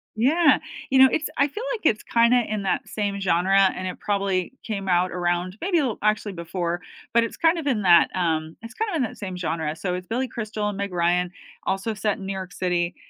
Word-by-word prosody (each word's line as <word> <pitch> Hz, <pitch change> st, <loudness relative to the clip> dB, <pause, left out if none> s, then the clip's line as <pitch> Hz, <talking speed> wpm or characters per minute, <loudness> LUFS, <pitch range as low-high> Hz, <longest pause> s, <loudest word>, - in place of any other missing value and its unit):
Yeah. 295 Hz, +7 st, +4 dB, 0.3 s
You 265 Hz, 0 st, +4 dB
know, 265 Hz, -, +9 dB
it's 315 Hz, -, -1 dB
I 280 Hz, -, +4 dB
feel 425 Hz, -, -6 dB
like 450 Hz, -, -5 dB
it's 215 Hz, -7 st, +2 dB
kinda 235 Hz, +1 st, +3 dB
in 210 Hz, -2 st, -3 dB
that 190 Hz, -, -1 dB
same 200 Hz, -2 st, -2 dB
genre, 190 Hz, +1 st, +3 dB
and 185 Hz, -, -4 dB
it 185 Hz, -, -6 dB
probably 195 Hz, -1 st, -1 dB
came 200 Hz, -3 st, -4 dB
out 180 Hz, +1 st, +2 dB
around 175 Hz, +1 st, -1 dB
maybe 355 Hz, -1 st, +2 dB
little 260 Hz, -7 st, -1 dB
actually 215 Hz, -1 st, 0 dB
before, 170 Hz, 0 st, -3 dB, 0.3 s
but 235 Hz, 0 st, +5 dB
it's 230 Hz, -, -5 dB
kind 330 Hz, +1 st, +3 dB
of 305 Hz, -, -5 dB
in 245 Hz, -6 st, +1 dB
that, 175 Hz, -2 st, +6 dB
um 160 Hz, -3 st, -1 dB
it's 230 Hz, +1 st, -9 dB
kind 445 Hz, 0 st, -2 dB
of -, -, -2 dB
in 280 Hz, -, +1 dB
that 230 Hz, -, -5 dB
same 185 Hz, -3 st, -5 dB
genre, 160 Hz, -3 st, -2 dB
so 180 Hz, +2 st, -3 dB
it's 180 Hz, 0 st, -5 dB
Billy 250 Hz, +3 st, -1 dB
Crystal 215 Hz, -2 st, -3 dB
and 205 Hz, -, -5 dB
Meg 200 Hz, -1 st, -3 dB
Ryan 175 Hz, +1 st, +1 dB, 0.3 s
also 195 Hz, +4 st, -1 dB
set 210 Hz, 0 st, -1 dB
in 195 Hz, -, -8 dB
New 195 Hz, -, -3 dB
York 190 Hz, -1 st, -6 dB
City, 175 Hz, -1 st, -1 dB
195 Hz, 230 wpm, -24 LUFS, 180-235 Hz, 0.3 s, know